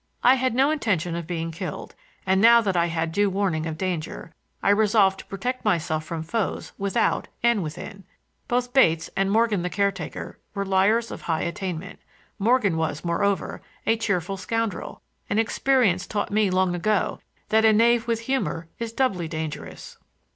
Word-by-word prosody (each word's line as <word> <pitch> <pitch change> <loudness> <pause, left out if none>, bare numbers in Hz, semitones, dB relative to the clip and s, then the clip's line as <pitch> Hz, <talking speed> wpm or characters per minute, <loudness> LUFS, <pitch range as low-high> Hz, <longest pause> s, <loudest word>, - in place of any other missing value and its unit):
I 250 - +7
had 260 -2 0
no 270 +4 +4
intention 185 - 0
of 170 -2 -5
being 165 -2 -3
killed, 160 - -6 0.3
and 190 0 +3
now 235 +2 +8
that 195 -4 -1
I 170 0 +3
had 165 -1 -2
due 205 +4 +2
warning 185 -5 -1
of 160 -1 -4
danger, 170 -2 -4 0.3
I 200 - +4
resolved 205 -2 +3
to - - -10
protect 245 +7 -3
myself 165 -6 0
from 160 0 -5
foes 200 +6 -2
without 200 +4 0 0.2
and 235 -3 +3
within. 175 +4 -7 0.4
Both 245 0 -1
Bates 165 -11 +3
and 195 0 +1
Morgan, 220 -2 +2
the 180 - -2
caretaker, 195 -1 -3 0.2
were 200 0 -1
liars 200 +5 +2
of - - -7
high 160 -2 -1
attainment. 185 0 -5 0.4
Morgan 210 -5 +2
was, 160 0 -2
moreover, 195 +3 0 0.2
a 225 - +3
cheerful 195 -4 -1
scoundrel, 225 0 -3 0.3
and 205 - +1
experience 225 -5 +2
taught 205 -1 -2
me 210 -1 +2
long 185 -1 +2
ago 205 +4 0 0.3
that 220 +1 +4
a 220 - +6
knave 230 +2 +3
with 230 -1 0
humor 230 -10 -2
is 230 -1 -3
doubly 195 -10 0
dangerous. 155 -1 -6
195 Hz, 170 wpm, -24 LUFS, 170-225 Hz, 0.4 s, now